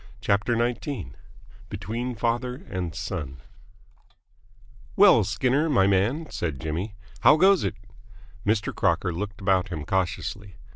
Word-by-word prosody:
CHAPTER 105 Hz, +4 st, +1 dB
XIX 120 Hz, -, -2 dB, 0.6 s
BETWEEN 120 Hz, +3 st, -4 dB
FATHER 120 Hz, +3 st, -2 dB
AND 90 Hz, -4 st, -3 dB
SON 65 Hz, -3 st, -5 dB, 1.6 s
"Well, 190 Hz, -, +7 dB
Skinner, 130 Hz, -, +1 dB
my 125 Hz, -10 st, +4 dB
man," 105 Hz, -, +1 dB
said 80 Hz, -6 st, -3 dB
Jimmy, 85 Hz, +7 st, -4 dB, 0.2 s
"how 150 Hz, -, +6 dB
goes 190 Hz, +2 st, +5 dB
it?" -, -, -2 dB, 0.7 s
Mr. 105 Hz, 0 st, 0 dB
Crocker 90 Hz, -, +1 dB
looked 105 Hz, +4 st, -5 dB
about 95 Hz, 0 st, +2 dB
him 80 Hz, -5 st, -5 dB
cautiously. 95 Hz, +1 st, -2 dB
105 Hz, 115 wpm, -25 LUFS, 95-125 Hz, 1.6 s, Well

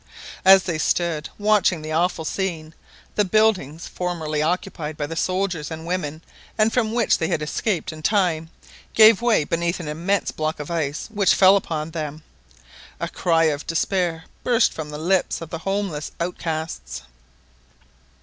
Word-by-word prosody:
As 190 Hz, 0 st, +8 dB
they 170 Hz, -4 st, -2 dB
stood 165 Hz, -2 st, 0 dB
watching 205 Hz, -6 st, +2 dB
the 155 Hz, -, -5 dB
awful 165 Hz, 0 st, 0 dB
scene, 165 Hz, -3 st, -3 dB, 0.4 s
the 210 Hz, -, +2 dB
buildings, 190 Hz, -7 st, +1 dB
formerly 160 Hz, -4 st, -3 dB
occupied 160 Hz, -2 st, -2 dB
by 145 Hz, -, -2 dB
the 165 Hz, +3 st, -6 dB
soldiers 185 Hz, -3 st, -1 dB
and 160 Hz, 0 st, -7 dB
women, 165 Hz, -3 st, -3 dB, 0.3 s
and 220 Hz, 0 st, +3 dB
from 225 Hz, -3 st, +1 dB
which 235 Hz, -1 st, +2 dB
they 160 Hz, -, 0 dB
had 155 Hz, -, -1 dB
escaped 170 Hz, +3 st, -2 dB
in 155 Hz, -, -10 dB
time, 165 Hz, -4 st, +1 dB, 0.5 s
gave 220 Hz, -1 st, +7 dB
way 235 Hz, -9 st, +3 dB
beneath 170 Hz, +3 st, -1 dB
an 170 Hz, -, -6 dB
immense 175 Hz, +6 st, -1 dB
block 155 Hz, 0 st, -3 dB
of 150 Hz, +2 st, -6 dB
ice 155 Hz, -3 st, -2 dB
which 205 Hz, -3 st, +3 dB
fell 190 Hz, 0 st, +7 dB
upon 160 Hz, -5 st, -2 dB
them. 155 Hz, -1 st, -5 dB, 0.8 s
A -, -, -2 dB
cry 165 Hz, -2 st, +1 dB
of 150 Hz, -2 st, 0 dB
despair 165 Hz, 0 st, 0 dB, 0.2 s
burst 240 Hz, -1 st, +3 dB
from 155 Hz, -2 st, -6 dB
the 150 Hz, -, -6 dB
lips 180 Hz, +4 st, +1 dB
of 165 Hz, -1 st, -9 dB
the 165 Hz, -, -4 dB
houseless 195 Hz, -5 st, -3 dB
outcasts. 160 Hz, -, -4 dB
170 Hz, 160 wpm, -22 LUFS, 155-195 Hz, 0.8 s, As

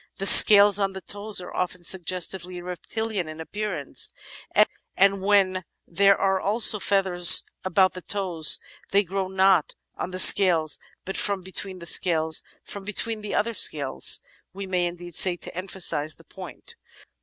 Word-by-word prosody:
The 195 Hz, -, -6 dB
scales 205 Hz, 0 st, +7 dB
on 195 Hz, -1 st, -2 dB
the 190 Hz, -, -10 dB
toes 205 Hz, +2 st, -3 dB
are 180 Hz, -, -12 dB
often 180 Hz, -1 st, -5 dB
suggestively 180 Hz, 0 st, -2 dB
reptilian 185 Hz, +2 st, -6 dB
in 155 Hz, +1 st, -11 dB
appearance, 175 Hz, -4 st, -3 dB, 0.9 s
and 195 Hz, 0 st, +1 dB
when 190 Hz, -2 st, 0 dB, 0.2 s
there 200 Hz, +3 st, +1 dB
are 195 Hz, -1 st, -1 dB
also 215 Hz, +1 st, +4 dB
feathers 185 Hz, -3 st, +4 dB, 0.2 s
about 185 Hz, +1 st, 0 dB
the 185 Hz, -, -10 dB
toes 180 Hz, -6 st, +1 dB, 0.3 s
they 200 Hz, +1 st, +1 dB
grow 190 Hz, +1 st, -5 dB
not 190 Hz, -3 st, 0 dB, 0.2 s
on -, -, -7 dB
the 185 Hz, -, -8 dB
scales 175 Hz, -5 st, +5 dB, 0.3 s
but 195 Hz, -, -6 dB
from 200 Hz, -2 st, -3 dB
between 190 Hz, 0 st, -5 dB
the 170 Hz, -, -12 dB
scales 160 Hz, -2 st, 0 dB
— -, -, -38 dB
from 200 Hz, -, -10 dB
between 215 Hz, +2 st, -5 dB
the 210 Hz, -, -7 dB
other 230 Hz, +3 st, -2 dB
scales 145 Hz, -9 st, +1 dB, 0.3 s
we 195 Hz, +1 st, -9 dB
may 180 Hz, -2 st, -3 dB
indeed 175 Hz, 0 st, -10 dB
say 180 Hz, +2 st, +3 dB
to -, -, -11 dB
emphasise 180 Hz, -5 st, -3 dB
the -, -, -21 dB
point. -, -, -13 dB
190 Hz, 155 wpm, -22 LUFS, 175-200 Hz, 0.9 s, scales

